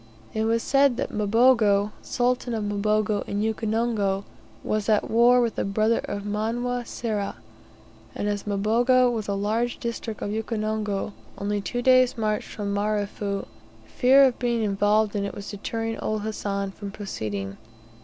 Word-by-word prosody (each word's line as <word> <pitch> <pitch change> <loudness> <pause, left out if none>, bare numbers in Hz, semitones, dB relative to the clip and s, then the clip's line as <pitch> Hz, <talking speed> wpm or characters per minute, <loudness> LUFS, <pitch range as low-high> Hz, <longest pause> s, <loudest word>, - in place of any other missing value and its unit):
It 220 0 0
was 230 +1 +1
said 275 -3 +3
that 270 - -2
Mbogo, 210 -1 +3
Sultan 245 -1 0
of 220 - -2
Mboga 210 0 0
in 205 +1 -1
Ukonongo, 220 -3 0 0.4
was 215 0 -1
at 210 -1 +2
war 240 +2 +6
with 230 -3 -1
the - - +1
brother 215 +3 +1
of 200 - -4
Manwa 235 +4 -2
Sera, 210 -4 -3 0.8
and 205 - -2
as 205 -1 -2
Mbogo 240 +5 +3
was 220 -3 -3
a 200 - -1
large 220 +4 -1
district 230 -2 -4
of 205 - -2
Ukonongo 215 -2 -2 0.2
only 205 0 -1
two 245 +4 -3
days' 255 -1 +5
march 215 -1 -1
from 200 -1 -4
Marefu; 205 -1 -2 0.4
fear 265 - +5
of 260 -3 +3
being 235 -2 0
involved 205 +1 +2
in 200 - 0
it 200 - -4
was 200 0 -7
deterring 225 +2 -4
old 215 -1 -2
Hassan 200 -2 -3
from 200 +1 -7
proceeding. 105 - -5
215 Hz, 155 wpm, -25 LUFS, 205-235 Hz, 0.8 s, war